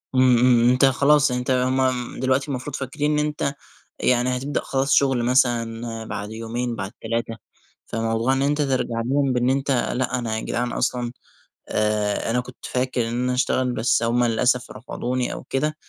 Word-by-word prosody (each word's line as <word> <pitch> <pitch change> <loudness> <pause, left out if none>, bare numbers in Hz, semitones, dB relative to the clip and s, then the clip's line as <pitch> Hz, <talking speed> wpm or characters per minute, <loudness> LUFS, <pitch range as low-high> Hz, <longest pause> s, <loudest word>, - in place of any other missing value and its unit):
إمم، 130 -2 +5
إمم، 125 0 +5
إمم 120 - +5
أنت 125 +2 +4
خلاص 140 +1 +4
أنت 125 +1 -1
هُم 130 0 +1
م 130 -2 -1
دلوقتي 130 +2 +1
المفروض 135 0 -4
فاكرين 150 +2 -1
إن 150 - +1
أنت 150 -2 -2 0.5
يعني 125 0 +2
هتبدأ 140 +3 -2
خلاص 135 +1 -1
شُغل 135 -4 +3
مثلًا 115 -2 0
بعد 105 0 -5
يومين 115 +2 -3
بعد 100 -2 -5
3 115 0 -2 0.5
فموضوع 115 +2 0
إن 135 - 0
أنت 145 +2 +1
ترجع 130 -4 0
لهم 135 0 +1
بإن 125 +1 +1
أنت 135 +1 0
لأ، 125 0 0
أنا 115 -2 -2
يا - - -3
جدعان 120 0 -2
أصلًا 125 -1 -1 0.6
آآ 105 0 0
أنا 125 - +1
كنت 125 0 -12
فاكر 125 -2 -1
إن - - -4
أنا 125 - 0
هاشتغل، 125 0 +1
بس 115 -1 +1
هُم 120 +1 +2
للأسف 125 +2 +1
رفضوني 125 +1 -3
أو - - -7
كده، 150 +4 -1
125 Hz, 180 wpm, -23 LUFS, 120-135 Hz, 0.6 s, إمم